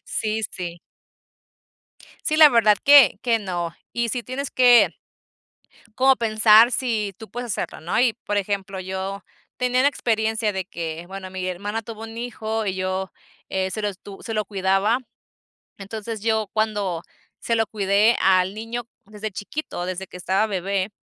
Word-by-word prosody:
Sí 215 0 -2
sí. 175 -2 -6 1.5
Sí, 310 - +1
la 310 -1 +9
verdad 215 -5 +4
que 285 -2 +7
que 235 -2 +2
no. 175 -4 -4 0.2
Y 235 0 -1
sí 245 +1 -2
tienes 260 +3 -5
que 245 -2 +6 1.0
como 265 +1 +5
pensar 220 +1 +5
sí 220 -7 -1
tú 220 - -10
puedes 245 0 -5
hacerlo, - - -4
¿no?, 170 +6 -1
y, 245 -3 +3
por 205 - -1
ejemplo, 195 -1 -2
yo 190 +1 -5 0.3
tenía 250 0 +1
la 280 - +5
experiencia 220 -4 0
de 190 -1 -3
que, 165 -1 -6
bueno, 190 0 -8
mi 185 0 -4
hermana 205 +5 -3
tuvo 220 -1 -9
un 225 0 -8
hijo 225 -2 -3
y 190 - -1
yo, 185 +1 -3 0.4
eh, 190 0 -1
se 215 +3 -4
lo 210 - +1
estu 200 0 -9
se 225 - -5
lo 215 - 0
cuidaba, 195 +4 +1 0.8
entonces, 215 +2 -6
yo 220 -2 0
cuando 205 -6 -1 0.4
se 230 - -1
lo 225 -1 +2
cuidé 205 +2 +3
al 185 0 +3
niño 230 +2 -5 0.2
desde 210 +1 -6
chiquito, 205 -2 -5
desde 185 +1 -5
que - - -10
estaba 190 +4 +1
bebé, 195 0 -1
210 Hz, 165 wpm, -23 LUFS, 190-230 Hz, 1.5 s, la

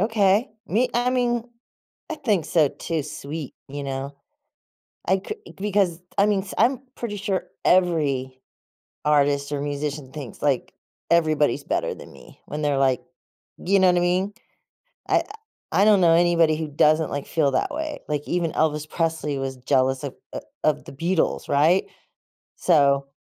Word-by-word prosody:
Okay. 210 +2 +3 0.2
Me 235 +7 +1
I 245 +1 +2
mean, 240 -2 +1 0.7
I - - -1
think 205 - 0
so 155 -4 +3
too 160 +2 -3
sweet, 150 0 -7
you 145 +1 -6
know? 135 +1 -4 0.9
I 190 0 +2
c 430 - -4 0.2
because, 195 -4 +1
t 180 - -33
I 200 - +5
mean, 200 -2 +1
s 190 - -8
I'm 250 +4 +3 0.2
pretty 215 -4 -4
sure 195 -2 -2 0.2
every 145 -8 +2 0.6
artist 145 -1 +2
or 145 - -1
musician 145 -1 -4
thinks, 140 -7 -8
like, 140 -3 0 0.4
"Everybody's 155 -5 +2
better - - -1
than - - -12
me." 60 - -16
When 150 +1 -5
they're 145 -2 +1
like 130 -2 +2 0.6
you 195 +2 +3
know, 185 - +5
what 180 - +4
I - - +2
mean? 180 +3 +1 0.8
I - - +4 0.5
I 200 - +4
I - - +5
don't 210 -3 +5
know 170 -2 +5
anybody 170 -2 +4
who 160 -1 -3
doesn't, 155 +2 +3
like, 140 0 -3
feel 150 -4 +1
that 130 - 0
way. 305 -1 -4
Like, 150 -1 -2
even 175 -2 0
Elvis 155 -1 0
Presley 160 -4 -1
was 135 -1 -3
jealous 130 +2 +1
of, 140 - -4 0.2
uh, - - -3 0.3
of 155 - +2
the - - -9
Beatles, 165 +5 -1
right? 155 +6 +4 0.7
So 140 -5 +3
160 Hz, 165 wpm, -24 LUFS, 140-190 Hz, 0.9 s, I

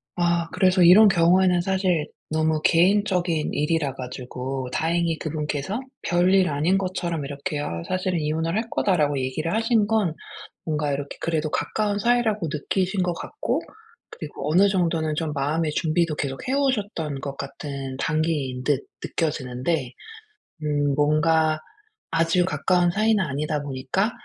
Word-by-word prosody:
아. 170 -1 +1
그래서 185 -1 +4
이런 200 +5 +8
경우에는 180 0 +4
사실 185 -4 0 0.2
너무 155 0 +1
개인적인 180 -2 +2
일이라 150 -2 0
가지고 130 +1 -5
다행히 165 0 0
그분께서 155 - -3 0.2
별일 180 +1 +3
아닌 155 +7 +1
것처럼 175 -5 -2
이렇게 145 +1 -4
"어 85 - -4
사실은 185 -2 -1
이혼을 160 +3 -1
할 225 +1 -2
거다."라고 150 -7 +1
얘기를 155 +7 -2
하신 225 -1 +2
건 215 -8 +1 0.5
뭔가 150 -2 -1
이렇게 140 0 -5
그래도 160 -2 -1
가까운 205 +3 -1
사이라고 220 -5 +1
느끼신 185 +5 -1
것 175 -1 0
같고 430 - -3 0.5
그리고 150 -2 -6
어느 195 +4 +5
정도는 165 -5 0
좀 160 -1 -2
마음의 150 +3 0
준비도 160 0 0
계속 135 - -4
해 260 - 0
오셨던 205 - -1
것 140 -1 -5
같은 140 -1 -6
단계인 150 -4 -1
듯 140 -1 0 0.2
느껴지는데 130 -2 -2 0.7
음 145 -1 +1
뭔가 155 +1 +2 0.5
아주 165 +2 +2
가까운 180 -2 +2
사이는 215 0 +2
아니다 150 0 -2
보니까 140 - -1
165 Hz, 320 characters per minute, -24 LUFS, 145-185 Hz, 0.7 s, 이런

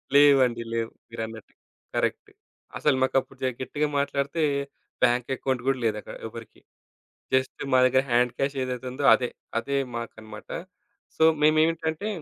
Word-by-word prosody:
లేవండి. 135 -5 +6
లేవు. 115 0 -1 0.2
మీరన్నట్టు. 110 -1 -7 0.4
కరెక్ట్. - - -1 0.5
అసలు 145 -3 +2
మాకప్పుడు 135 0 0
జ - - +2 0.2
గట్టిగా 150 +3 -1
మాట్లాడితే 140 +3 -1 0.6
బ్యాంక్ 125 0 +3
అకౌంట్ 130 -2 -2
గూడా 135 -1 +2
లేదక్కడ 105 -1 -2
ఎవరికీ. 115 -1 -11 0.7
జస్ట్ 130 0 +1
మా - - +7
దగ్గర 130 +1 +3
హాండ్ 120 +1 +3
క్యాష్ 140 +1 -1
ఏదైతే 125 0 -4
ఉందో 140 +2 -3
అదే. 125 -1 +1 0.3
అదే 140 +4 -2 0.2
మాకన్నమాట. 110 -2 -9 0.7
సో, - - +3 0.2
మేమేంటంటే 160 +4 +2
130 Hz, 130 wpm, -26 LUFS, 115-140 Hz, 0.7 s, మా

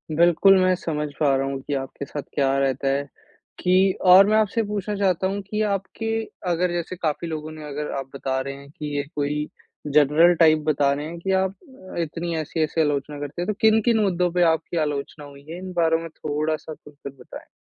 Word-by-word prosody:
बिल्कुल, 175 +4 +5
मैं 185 0 +4
समझ 150 -4 -3
पा 140 -3 +3
रहा 135 0 0
हूँ 135 0 -3
कि 145 - -5
आपके 135 +1 -5
साथ 145 - -5
क्या 135 -1 +1
रहता 135 0 0
है, 140 +1 +1 0.6
कि 185 +1 +4
और 185 +2 +8
मैं 215 +1 +3
आपसे 220 +1 +1
पूछना 210 -1 -3
चाहता 190 -2 +1
हूँ 200 +1 -3
कि 210 0 -1
आपके 200 +3 -3 0.4
अगर 175 +1 +1
जैसे 175 +1 -3
काफ़ी 170 -1 -2
लोगों 155 -1 -5
ने 155 -1 -9
अगर 150 +1 -4
आप 135 -1 -5
बता 130 -1 -2
रहे 135 +1 -4
हैं 140 0 -13
कि, 150 0 -6
ये 145 - 0
कोई 150 +1 -1 0.4
जनरल 150 +4 +5
टाइप 155 -2 +6
बता 140 -2 +3
रहे 145 +1 -4
हैं 170 +1 -8
कि 190 +3 -2
आप 190 0 +1 0.4
अ, - - -2
इतनी 170 +1 -3
ऐसी-ऐसी 160 +1 -1
आलोचना 145 -1 -1
करते 145 +3 -5
हैं, 175 - -3
तो 215 - 0
किन-किन 220 +1 +4
मुद्दों 180 -3 +1
पे 180 0 +2
आपकी 160 +1 -4
आलोचना 145 +1 -5
हुई 140 0 -14
है? 165 - -6
इन 185 0 -7
बारे 165 -2 +3
में 165 - -7
थोड़ा-सा 155 +1 -3
खुलकर 145 -2 -11
बताएँ। - - -11
160 Hz, 210 wpm, -23 LUFS, 145-185 Hz, 0.6 s, और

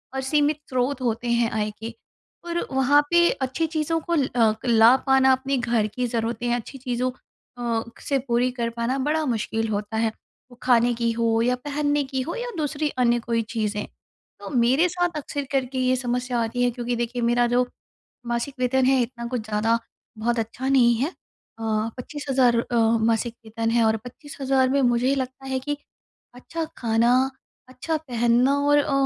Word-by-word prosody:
और 265 - -1
सीमित 295 +1 +2
स्रोत 255 +1 -1
होते 235 0 -1
हैं 235 -1 +2
आय 215 -1 -1
के 225 +1 -6 0.5
और 345 0 -2
वहाँ 265 +2 +4
पे 345 0 +5 0.2
अच्छी 320 +5 -1
चीज़ों 325 +2 0
को - - +2
अ, 240 -6 +2
ला 230 +2 +7
पाना 265 0 +5
अपने 270 0 -1
घर 235 -3 +1
की 245 +4 -3
ज़रूरतें 230 +1 -2
हैं, 240 - +2
अच्छी 245 +3 -6
चीज़ों 250 0 -2 0.5
अ, 230 -2 -1 0.3
से 275 -1 +2
पूरी 245 +1 +2
कर 230 0 0
पाना 250 +3 0
बड़ा 315 0 +1
मुश्किल 225 +1 -2
होता 210 +1 -3
है। 225 -1 +1 0.4
वो 245 - -15
खाने 240 -1 +4
की 230 0 +1
हो 230 0 +1
या 250 +1 +2
पहनने 290 0 0
की 265 -1 -3
हो 340 - -3
या - - -4
दूसरी 300 0 -1
अन्य 240 0 +3
कोई 230 0 -1
चीज़ें। 210 -2 -1 0.5
तो - - -8
मेरे 260 +6 +3
साथ 350 -2 -1
अक्सर 285 -1 -4
करके 265 -1 -1
ये 255 0 +2
समस्या 245 -1 -1
आती 240 +2 -1
है 245 - +3
क्योंकि 240 0 -3
देखिए 240 +1 -2
मेरा 240 +1 +3
जो 245 +1 +2 0.6
मासिक 240 +3 -2
वेतन 255 +1 +2
है 265 -1 +4
इतना 235 0 -4
कुछ 245 -2 -2
ज़्यादा 220 +2 +1 0.4
बहुत 235 +1 0
अच्छा 230 +4 -4
नहीं 240 -3 +5
है। 270 +8 0
अ, 225 -9 -17 0.3
25000 260 -3 +1
अ, 240 - -3 0.3
मासिक 230 +1 0
वेतन 225 +1 -2
है 235 -1 +3
और 220 0 +2
25000 265 0 -1
में 275 +1 +2
मुझे 250 +3 +2
लगता 260 0 -5
है 260 0 -1
कि 290 +2 -3 0.6
अच्छा 325 +6 -5
खाना, 230 +1 +2 0.6
अच्छा 310 +5 -2
पहनना 245 -1 +2
और 290 0 +5
अ, 285 - -1
245 Hz, 180 wpm, -24 LUFS, 235-270 Hz, 0.6 s, ला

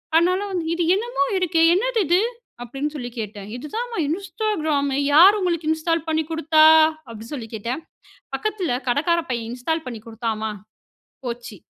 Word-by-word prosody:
அதனால 355 +3 +4
வந்து 355 -3 -2
"இது 345 - 0
என்னமோ 460 - -1
இருக்கே, 340 -3 +1
என்னது 460 +4 +1
இது?" 350 +3 +4 0.4
அப்படீன்னு 275 +5 -4
சொல்லி 245 -4 -5
கேட்டேன். 205 -2 -6
"இது 250 +5 -7
தான்மா 475 0 -3
Instagram." 335 -5 -1 0.3
"யாரு 365 +7 +8
உங்களுக்கு 340 -4 -1
இன்ஸ்டால் 325 0 0
பண்ணி 315 0 +1
குடுத்தா?" 315 -1 +4 0.4
அப்படி 225 -1 -9
சொல்லி 240 -6 -5
கேட்டேன். 235 +8 -4 0.5
"பக்கத்தில 385 - -1
கடைக்கார 330 +7 +2
பையன் 235 -2 -2
இன்ஸ்டால் 320 +6 -2
பண்ணி 235 -3 -6
குடுத்தான்மா." 220 -1 -3 0.8
போச்சு. 235 -2 -6
315 Hz, 145 wpm, -22 LUFS, 245-355 Hz, 0.8 s, யாரு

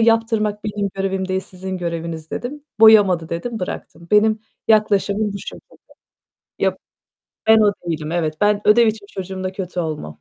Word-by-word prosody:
yaptırmak 225 -2 +1
benim 205 -1 -2
görevim 195 -1 -2
değil, 190 0 0
sizin 190 0 -7
göreviniz." 165 -2 -5
dedim. 285 +5 -5 0.2
"Boyamadı." 200 -7 +6
dedim, 225 +8 -4
bıraktım. 170 -2 -7
Benim 215 +1 +4 0.3
yaklaşımım 210 -1 +2
bu 200 - -5
şekilde. - - -11 0.8
Ya - - +1 0.7
ben 220 0 +7
o 205 -1 +4 0.2
değilim 155 -1 -3
evet. 160 -3 -1
Ben 205 0 +3
ödev 230 +2 +6
için 215 -2 -2
çocuğumla 190 0 -5
kötü 180 -2 -4
olmam. 155 - -4
200 Hz, 145 wpm, -20 LUFS, 180-215 Hz, 0.8 s, ben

